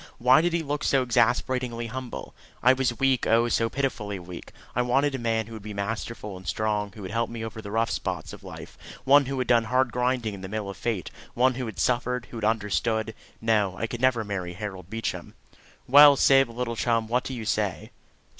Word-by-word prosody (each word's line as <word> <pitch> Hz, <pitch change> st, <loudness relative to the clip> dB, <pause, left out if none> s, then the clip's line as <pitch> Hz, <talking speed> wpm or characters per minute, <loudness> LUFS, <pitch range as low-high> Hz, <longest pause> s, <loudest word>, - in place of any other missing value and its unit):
Why 125 Hz, +5 st, +5 dB
did 175 Hz, 0 st, 0 dB
he 170 Hz, -1 st, 0 dB
look 145 Hz, 0 st, -3 dB
so 135 Hz, -2 st, +3 dB
exasperatingly 125 Hz, -1 st, +1 dB
humble? 125 Hz, +1 st, -7 dB, 0.3 s
I 125 Hz, +2 st, +7 dB
was 130 Hz, -3 st, -1 dB
weak, 135 Hz, -3 st, +2 dB
oh, 115 Hz, +1 st, +4 dB
so 115 Hz, 0 st, +1 dB
pitifully 110 Hz, -6 st, -2 dB
weak! 90 Hz, -1 st, -10 dB, 0.2 s
I 125 Hz, -, +2 dB
wanted 135 Hz, +4 st, +2 dB
a 135 Hz, -, -3 dB
man 115 Hz, -1 st, 0 dB
who 115 Hz, -, -11 dB
would 110 Hz, -, -8 dB
be 105 Hz, 0 st, -8 dB
masterful 105 Hz, 0 st, -4 dB
and 90 Hz, 0 st, -11 dB
strong, 105 Hz, 0 st, -1 dB
who 105 Hz, -, -10 dB
would 95 Hz, -, -6 dB
help 115 Hz, 0 st, -1 dB
me 115 Hz, -1 st, -5 dB
over 110 Hz, 0 st, -7 dB
the 100 Hz, -, -8 dB
rough 115 Hz, +2 st, 0 dB
spots -, -, -4 dB
of -, -, -11 dB
life -, -, -10 dB, 0.2 s
one 140 Hz, 0 st, +5 dB
who 135 Hz, 0 st, -3 dB
had 130 Hz, -, -1 dB
done 115 Hz, -2 st, +4 dB
hard 125 Hz, +1 st, +1 dB
grinding 125 Hz, -3 st, 0 dB
in 100 Hz, -, -8 dB
the 95 Hz, -, -7 dB
mill 105 Hz, -1 st, -4 dB
of -, -, -11 dB
fate 110 Hz, -7 st, -3 dB, 0.2 s
one 130 Hz, +2 st, +3 dB
who 125 Hz, -1 st, -4 dB
had 110 Hz, -5 st, -8 dB
suffered, 125 Hz, +4 st, 0 dB
who 120 Hz, -, -7 dB
had 110 Hz, -, -6 dB
understood. 110 Hz, +1 st, 0 dB, 0.3 s
No; 105 Hz, -4 st, +1 dB
I 115 Hz, -, -1 dB
could 120 Hz, +1 st, -6 dB
never 130 Hz, -3 st, +3 dB
marry 95 Hz, -4 st, -4 dB
Harold 95 Hz, -2 st, -7 dB
Beecham. 115 Hz, +1 st, -4 dB, 0.5 s
"Well, 145 Hz, +1 st, +9 dB
Syb, 135 Hz, -1 st, +5 dB
little 115 Hz, 0 st, -3 dB
chum, 115 Hz, -1 st, 0 dB
what 125 Hz, +2 st, 0 dB
do 130 Hz, -, -5 dB
you 115 Hz, -2 st, -6 dB
say?" -, -, -2 dB
115 Hz, 220 wpm, -26 LUFS, 105-125 Hz, 0.5 s, Well